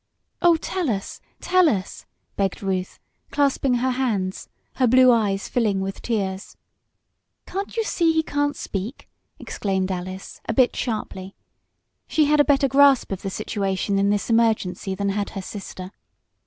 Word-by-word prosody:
"Oh, 345 Hz, -1 st, +6 dB
tell 345 Hz, 0 st, -2 dB
us! 195 Hz, -3 st, -4 dB, 0.2 s
Tell 365 Hz, -2 st, +4 dB
us!" 195 Hz, -7 st, -4 dB, 0.3 s
begged 195 Hz, 0 st, -1 dB
Ruth, 185 Hz, -1 st, -2 dB, 0.3 s
clasping 275 Hz, -2 st, +1 dB
her 255 Hz, +2 st, +1 dB
hands, 215 Hz, -8 st, -2 dB, 0.3 s
her 255 Hz, -1 st, +3 dB
blue 255 Hz, +1 st, +6 dB
eyes 205 Hz, -4 st, +1 dB
filling 215 Hz, -5 st, +1 dB
with 195 Hz, 0 st, -4 dB
tears. 195 Hz, -4 st, -3 dB, 0.9 s
"Can't 395 Hz, +4 st, -5 dB
you 450 Hz, -, +2 dB
see 335 Hz, -6 st, +2 dB
he 320 Hz, 0 st, +1 dB
can't 290 Hz, -1 st, -1 dB
speak!" 210 Hz, +5 st, -5 dB, 0.3 s
exclaimed 190 Hz, -2 st, -2 dB
Alice, 185 Hz, +1 st, -6 dB
a 225 Hz, -, 0 dB
bit 255 Hz, -2 st, +4 dB
sharply. 195 Hz, -5 st, -4 dB, 0.7 s
She 310 Hz, -, +3 dB
had 300 Hz, +1 st, +3 dB
a -, -, +8 dB
better 280 Hz, -1 st, +3 dB
grasp 275 Hz, -3 st, +4 dB
of 195 Hz, -, -3 dB
the 195 Hz, -, -3 dB
situation 195 Hz, -1 st, -1 dB
in 200 Hz, 0 st, +2 dB
this 205 Hz, 0 st, 0 dB
emergency 215 Hz, -5 st, +1 dB
than 200 Hz, +1 st, -1 dB
had 200 Hz, +1 st, -1 dB
her 195 Hz, -, -6 dB
sister. 185 Hz, -2 st, -8 dB
215 Hz, 155 wpm, -23 LUFS, 195-275 Hz, 0.9 s, a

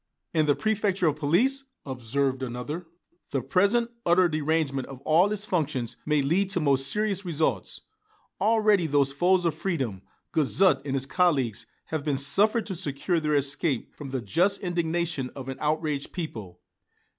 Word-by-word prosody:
"And 155 Hz, -2 st, +2 dB
the 145 Hz, -, +4 dB
préfecture 205 Hz, -4 st, 0 dB
of 150 Hz, -1 st, +1 dB
police," 235 Hz, -, +1 dB, 0.2 s
observed 130 Hz, +1 st, -1 dB
another 130 Hz, +7 st, -5 dB, 0.4 s
"the 135 Hz, -4 st, -2 dB
present 200 Hz, -, +2 dB
utter 175 Hz, +1 st, +4 dB
derangement 155 Hz, -4 st, -1 dB
of 135 Hz, -2 st, -9 dB
all 165 Hz, +7 st, +3 dB
its 210 Hz, 0 st, -1 dB
functions 150 Hz, -, -2 dB
may 150 Hz, -2 st, +2 dB
lead 185 Hz, +8 st, +1 dB
to 195 Hz, -, 0 dB
most 135 Hz, -3 st, +3 dB
serious 210 Hz, -2 st, -1 dB
results. 150 Hz, -, -2 dB, 0.6 s
Already 210 Hz, -4 st, +3 dB
those 140 Hz, -2 st, +2 dB
foes 180 Hz, +4 st, +2 dB
of 165 Hz, -, +2 dB
freedom, 130 Hz, -, -3 dB, 0.3 s
Guizot 155 Hz, 0 st, +3 dB
and 135 Hz, -1 st, -2 dB
his 135 Hz, 0 st, 0 dB
colleagues, 135 Hz, -, +1 dB, 0.2 s
have 155 Hz, -3 st, -2 dB
been 145 Hz, -2 st, 0 dB
suffered 205 Hz, -, +2 dB
to 200 Hz, -, -4 dB
secure 170 Hz, 0 st, -1 dB
their 150 Hz, -1 st, 0 dB
escape 140 Hz, -1 st, 0 dB
from 145 Hz, -2 st, -8 dB
the 130 Hz, -1 st, -3 dB
just 175 Hz, -, +1 dB
indignation 170 Hz, -5 st, -1 dB
of 135 Hz, -1 st, -7 dB
an 135 Hz, -, -5 dB
outraged 150 Hz, -2 st, -1 dB
people. 110 Hz, -, -6 dB
155 Hz, 155 wpm, -26 LUFS, 135-185 Hz, 0.6 s, the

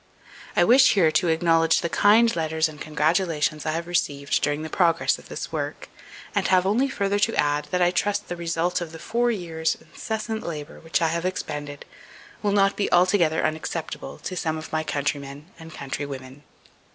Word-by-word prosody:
I -, -, +5 dB
wish 255 Hz, +3 st, +6 dB
here 170 Hz, -6 st, +4 dB
to 175 Hz, -, +2 dB
acknowledge 165 Hz, 0 st, +3 dB
the 170 Hz, -, -1 dB
kind 220 Hz, +6 st, +4 dB
letters 160 Hz, -1 st, 0 dB
and 150 Hz, -2 st, -11 dB
congratulations 155 Hz, 0 st, 0 dB
I 155 Hz, -, 0 dB
have 165 Hz, +1 st, -3 dB
received 145 Hz, -5 st, 0 dB
during 145 Hz, +1 st, -1 dB
the -, -, -4 dB
progress 170 Hz, -3 st, +2 dB
of -, -, -16 dB
this -, -, -6 dB
work, -, -, -4 dB, 0.4 s
and 200 Hz, -3 st, +1 dB
have 185 Hz, -1 st, +3 dB
only 240 Hz, +8 st, +2 dB
further 200 Hz, -3 st, 0 dB
to 225 Hz, +2 st, +1 dB
add, 145 Hz, 0 st, +1 dB
that 180 Hz, -1 st, +1 dB
I 175 Hz, -, +3 dB
trust 205 Hz, +3 st, -1 dB
the 175 Hz, -, -4 dB
result 170 Hz, +1 st, -1 dB
of 165 Hz, -2 st, -6 dB
the -, -, -7 dB
four 240 Hz, +7 st, 0 dB
years' 170 Hz, -5 st, -1 dB
incessant 220 Hz, -1 st, -5 dB
labour 150 Hz, -3 st, -7 dB
which 160 Hz, -1 st, -1 dB
I 165 Hz, -, +3 dB
have 170 Hz, +1 st, -2 dB
expended 145 Hz, -6 st, -4 dB, 0.6 s
will 205 Hz, -, +1 dB
not 195 Hz, -1 st, +3 dB
be 205 Hz, -, -1 dB
altogether 175 Hz, -3 st, +3 dB
unacceptable 160 Hz, +1 st, -4 dB
to 185 Hz, -, -6 dB
some 160 Hz, -2 st, -1 dB
of 155 Hz, -, -8 dB
my 155 Hz, 0 st, 0 dB
countrymen 145 Hz, +2 st, -4 dB
and 165 Hz, 0 st, -11 dB
countrywomen. 140 Hz, -1 st, -6 dB
165 Hz, 185 wpm, -24 LUFS, 155-190 Hz, 0.6 s, wish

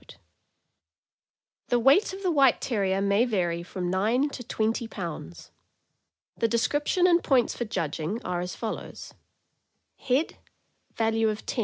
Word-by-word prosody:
The 245 Hz, -, +2 dB
weight 275 Hz, -, +4 dB
of 385 Hz, +1 st, -8 dB
the 365 Hz, -, +2 dB
White 275 Hz, -5 st, +4 dB
Terrier 195 Hz, -5 st, 0 dB
may 200 Hz, +3 st, +3 dB
vary 175 Hz, -8 st, 0 dB
from 180 Hz, 0 st, -4 dB
nine 225 Hz, +9 st, +1 dB
to 245 Hz, -, -7 dB
twenty 225 Hz, 0 st, -1 dB
pounds. 165 Hz, -, -7 dB, 0.8 s
The 230 Hz, -, +1 dB
description 290 Hz, -, +1 dB
and 345 Hz, -1 st, +4 dB
points 255 Hz, -5 st, +2 dB
for 240 Hz, -, -3 dB
judging 165 Hz, -1 st, -3 dB
are 180 Hz, -1 st, -2 dB
as 180 Hz, 0 st, -5 dB
follows: 225 Hz, -, -6 dB, 0.9 s
Value. 265 Hz, +6 st, +1 dB, 0.7 s
Value. 225 Hz, -1 st, +1 dB
225 Hz, 125 wpm, -27 LUFS, 190-260 Hz, 0.9 s, weight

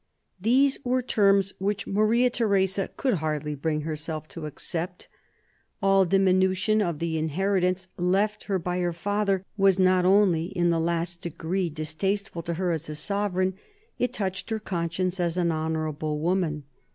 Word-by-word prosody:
These 265 Hz, +6 st, +3 dB
were 255 Hz, 0 st, +1 dB
terms 195 Hz, -4 st, +3 dB
which 200 Hz, +1 st, -1 dB
Maria 220 Hz, +5 st, +2 dB
Theresa 195 Hz, -4 st, +1 dB
could 260 Hz, -3 st, +1 dB
hardly 150 Hz, -1 st, -2 dB
bring 150 Hz, +1 st, -1 dB
herself 155 Hz, 0 st, -4 dB
to 160 Hz, -3 st, -6 dB
accept. 170 Hz, +4 st, -4 dB, 0.7 s
All 195 Hz, -1 st, +4 dB
diminution 190 Hz, +3 st, +3 dB
of 170 Hz, -6 st, -1 dB
the 160 Hz, 0 st, -1 dB
inherit 185 Hz, +5 st, 0 dB
ance 185 Hz, +1 st, 0 dB
left 195 Hz, +4 st, +1 dB
her 195 Hz, -2 st, 0 dB
by 180 Hz, 0 st, -2 dB
her 175 Hz, -1 st, 0 dB
father 200 Hz, +1 st, 0 dB
was 195 Hz, -2 st, +4 dB
not 185 Hz, -1 st, +4 dB
only 185 Hz, -3 st, +4 dB
in 175 Hz, -1 st, 0 dB
the 165 Hz, -, +1 dB
last 170 Hz, +1 st, -1 dB
degree 170 Hz, +2 st, -2 dB
distasteful 170 Hz, +5 st, -2 dB
to 170 Hz, 0 st, -3 dB
her 180 Hz, +1 st, 0 dB
as 160 Hz, -1 st, -3 dB
a 150 Hz, -, -4 dB
sovereign, 190 Hz, +2 st, 0 dB, 0.5 s
it 250 Hz, -, +1 dB
touched 190 Hz, -1 st, -3 dB
her 220 Hz, -, 0 dB
conscience 180 Hz, -2 st, -2 dB
as 175 Hz, 0 st, 0 dB
an 175 Hz, -2 st, +2 dB
honourable 155 Hz, -1 st, -2 dB
woman. 160 Hz, -2 st, 0 dB
185 Hz, 155 wpm, -26 LUFS, 165-195 Hz, 0.7 s, All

